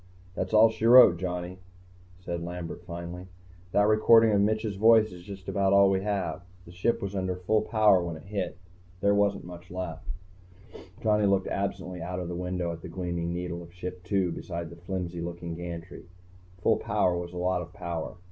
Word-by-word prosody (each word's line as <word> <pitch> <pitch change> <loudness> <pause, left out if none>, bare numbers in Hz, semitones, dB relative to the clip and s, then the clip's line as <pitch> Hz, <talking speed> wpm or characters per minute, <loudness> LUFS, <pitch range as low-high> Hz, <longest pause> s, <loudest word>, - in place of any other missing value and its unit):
"That's 95 0 -3
all 110 +1 +6
she 110 0 -1
wrote, 120 -8 +9
Johnny," 90 0 -4 0.6
said 85 -2 -4
Lambert, 85 0 -6
finally. 85 +1 -7 0.4
"That 105 +2 +4
recording 110 +1 +6
of 100 -1 +3
Mitch's 110 0 0
voice 110 +1 +5
is 90 -1 -10
just 95 +1 -10
about 100 -1 +1
all 100 0 +6
we 95 0 +1
have. 95 -6 -2 0.2
The 85 - -12
Ship 90 +7 0
was 100 0 -4
under 95 -1 -1
full 105 +4 +1
power 105 -4 +4
when 85 -1 -4
it - - -13
hit. 95 -2 -4 0.4
There 100 +1 +4
wasn't 100 -1 +1
much 90 0 -11
left." 90 -3 -6 1.0
Johnny 105 -2 +3
looked 95 -1 +2
absently 95 -3 -3
out 90 +1 -4
the 90 - -4
window 90 0 -2
at 85 0 -8
the 90 - -8
gleaming 85 -1 -3
needle 85 0 -4
of 85 0 -12
Ship 90 0 -6
II 95 -3 +2
beside 85 -1 -6
the - - -10
flimsy 90 -1 -5
looking 85 0 -5
gantry. 85 0 -7 0.6
Full - - +4
power 90 -1 +1
was 85 0 -5
a - - -6
lot 90 0 0
of 85 0 -9
power. 85 -2 -5
90 Hz, 185 wpm, -28 LUFS, 85-100 Hz, 1.0 s, wrote